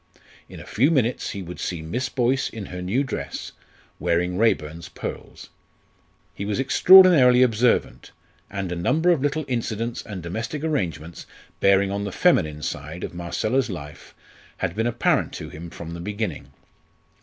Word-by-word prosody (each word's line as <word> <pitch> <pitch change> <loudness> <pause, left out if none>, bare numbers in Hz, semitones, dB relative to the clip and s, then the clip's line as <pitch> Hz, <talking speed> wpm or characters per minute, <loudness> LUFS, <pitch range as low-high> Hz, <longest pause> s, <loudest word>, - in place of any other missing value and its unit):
In - - -10
a - - -10
few 130 +7 +2
minutes 130 -6 0
he 100 -2 -5
would 90 0 -9
see 85 -3 -4
Miss 125 +11 -3
Boyce 130 +2 0
in 110 -3 -7
her 90 -1 -7
new 105 +10 0
dress, 135 - -5 0.5
wearing 90 +1 0
Raeburn's 85 -5 0
pearls. 85 - -8 0.8
He - - -6
was 105 +4 -2
extraordinarily 140 -4 +7
observant, 120 0 +1 0.4
and 95 -2 -4
a - - -2
number 160 - +2
of 165 -6 +1
little 145 +2 -1
incidents 115 -1 -2
and 95 -5 -8
domestic 115 - -4
arrangements 85 - -3 0.3
bearing 100 0 +3
on 100 0 -2
the 100 - -4
feminine 80 - +2
side 75 +4 -5
of - - -5
Marcella's 100 +9 -1
life 75 -6 -9 0.4
had 90 -3 -2
been 110 +2 0
apparent 120 -1 +1
to - - -7
him 85 +2 -9
from 85 0 -8
the 85 - -7
beginning. 100 -7 -4
100 Hz, 155 wpm, -23 LUFS, 85-125 Hz, 0.8 s, extraordinarily